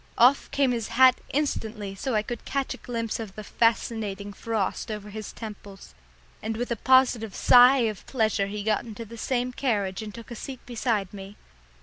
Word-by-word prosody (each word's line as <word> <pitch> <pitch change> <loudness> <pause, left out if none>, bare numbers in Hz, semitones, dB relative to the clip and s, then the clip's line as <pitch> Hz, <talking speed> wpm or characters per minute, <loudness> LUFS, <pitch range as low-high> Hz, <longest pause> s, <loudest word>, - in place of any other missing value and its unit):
Off 255 +4 +5
came 275 -2 +2
his 230 -3 -2
hat 255 +1 +5
instantly 220 -8 -2
so 235 +5 -3
I 210 - +2
could 235 +1 -6
catch 275 -1 -2
a - - -10
glimpse 230 -2 -3
of 215 -4 -7
the 215 - -7
fascinating 210 -3 0
frost 220 -2 -2
over 210 -1 -6
his 215 0 -6
temples, 205 -3 -10 0.5
and 220 0 -3
with 245 +1 -3
a - - +2
positive 245 -3 +3
sigh 250 +2 +7
of 210 -4 -6
pleasure 215 -5 +1
he 205 +1 -5
got 215 0 +1
into 230 0 -8
the 230 +2 -11
same 250 +1 -1
carriage 205 -8 -1
and 215 -1 -6
took 230 +3 -11
a - - -5
seat 260 +3 -8
beside 225 -5 -1
me. 195 0 -9
225 Hz, 190 wpm, -26 LUFS, 210-245 Hz, 0.5 s, sigh